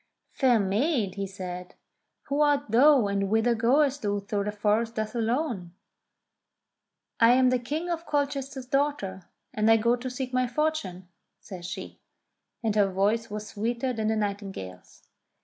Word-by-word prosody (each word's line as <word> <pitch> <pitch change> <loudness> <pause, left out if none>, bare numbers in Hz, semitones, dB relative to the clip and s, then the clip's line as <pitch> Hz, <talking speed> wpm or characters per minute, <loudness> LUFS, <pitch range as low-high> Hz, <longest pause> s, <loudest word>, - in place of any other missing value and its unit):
"Fair 250 -4 +3
maid," 210 - 0
he 200 0 -4
said, 180 -2 -7 0.5
"who 280 +1 -1
art 290 -5 +2
thou, 265 +1 +6
and 200 -1 -1
whither 225 +3 +3
goest 270 +5 +2
thou 205 -1 0
through 200 0 -3
the 210 - -1
forest 215 +2 0
thus 215 0 -3
alone 230 - -2 0.7
?" - - -58 0.7
"I 230 +1 +7
am 255 0 +4
the 255 - +2
King 300 +8 -3
of 340 -1 -3
Colchester's 280 -2 -2
daughter, 250 -9 -1 0.2
and 215 +1 +2
I 225 - +7
go 235 +2 +2
to 250 +1 -5
seek 255 0 -5
my 255 0 +2
fortune," 240 - -2 0.3
says 180 -3 -9
she, - - -7 0.6
and 220 -2 0
her 205 -2 +4
voice 210 +5 +1
was 210 0 -6
sweeter 235 +4 -2
than 220 -2 -2
the 220 - +1
nightingale's. 200 - -5
225 Hz, 160 wpm, -27 LUFS, 200-265 Hz, 0.7 s, I